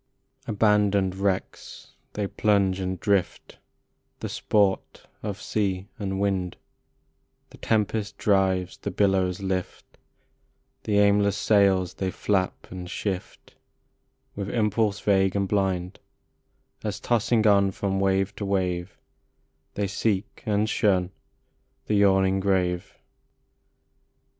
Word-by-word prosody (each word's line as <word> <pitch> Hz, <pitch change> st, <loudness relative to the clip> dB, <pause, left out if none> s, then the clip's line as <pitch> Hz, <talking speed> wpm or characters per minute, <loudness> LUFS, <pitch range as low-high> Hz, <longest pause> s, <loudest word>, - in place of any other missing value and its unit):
BANDONED 105 Hz, -3 st, +2 dB
wrecks 95 Hz, 0 st, -3 dB, 0.2 s
they 105 Hz, -, -2 dB
plunge 100 Hz, -2 st, +1 dB
and 95 Hz, -1 st, -3 dB
drift, 100 Hz, -2 st, -1 dB, 0.6 s
The -, -, -5 dB
sport 100 Hz, -3 st, 0 dB, 0.2 s
of 105 Hz, -1 st, -5 dB
sea 100 Hz, -2 st, -2 dB
and 95 Hz, -2 st, -3 dB
wind, 95 Hz, -3 st, -1 dB, 0.9 s
The -, -, -15 dB
tempest 105 Hz, -2 st, -1 dB
drives, 95 Hz, -3 st, +1 dB
the -, -, -5 dB
billows 95 Hz, -2 st, +1 dB
lift, 95 Hz, -1 st, -4 dB, 0.9 s
The 105 Hz, -1 st, +1 dB
aimless 100 Hz, -1 st, +3 dB
sails 95 Hz, -4 st, +3 dB
they 95 Hz, -, -2 dB
flap 95 Hz, 0 st, -2 dB
and 90 Hz, -1 st, -7 dB
shift 95 Hz, -1 st, -5 dB, 0.8 s
With 100 Hz, -1 st, -4 dB
impulse 105 Hz, -2 st, +1 dB
vague 95 Hz, -2 st, +2 dB
and 100 Hz, -1 st, 0 dB
blind, 95 Hz, -2 st, -1 dB, 0.8 s
As 105 Hz, -1 st, -3 dB
tossing 115 Hz, -1 st, +1 dB
on 100 Hz, -2 st, +5 dB
from 95 Hz, 0 st, -2 dB
wave 95 Hz, +1 st, +1 dB
to -, -, -4 dB
wave 90 Hz, -2 st, -2 dB, 0.8 s
They 100 Hz, -, 0 dB
seek 100 Hz, 0 st, -2 dB
and 105 Hz, 0 st, +1 dB
shun 95 Hz, -4 st, +1 dB, 0.7 s
the -, -, -1 dB
yawning 95 Hz, -1 st, +3 dB
grave. 90 Hz, -2 st, -1 dB
100 Hz, 110 wpm, -25 LUFS, 95-105 Hz, 0.9 s, on